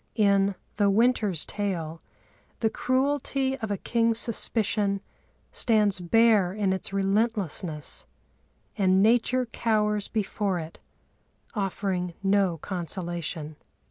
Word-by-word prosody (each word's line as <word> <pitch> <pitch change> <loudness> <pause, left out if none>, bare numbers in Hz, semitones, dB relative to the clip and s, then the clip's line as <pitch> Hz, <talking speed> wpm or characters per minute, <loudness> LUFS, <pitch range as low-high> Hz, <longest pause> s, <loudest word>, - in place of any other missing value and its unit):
In 200 -2 +3 0.2
The 205 -1 +3
Winter's 210 -5 +2
Tale 170 -6 -3 0.6
the 220 -1 +2
cruelty 270 0 0
of 220 -3 -4
a 200 - -1
king's 230 +2 +1
suspicion 215 -3 +1 0.5
stands 210 -5 +2
bare 205 0 +3
in 200 -2 0
its 190 - -4
relentlessness, 195 -6 -1 0.7
and 190 -2 +3
Nature 245 +3 +3
cowers 210 -3 0
before 205 -3 -1
it, 160 -1 -7 0.7
offering 190 -4 -2
no 195 -3 +2
consolation. 170 -3 -4
200 Hz, 100 wpm, -26 LUFS, 185-225 Hz, 0.7 s, In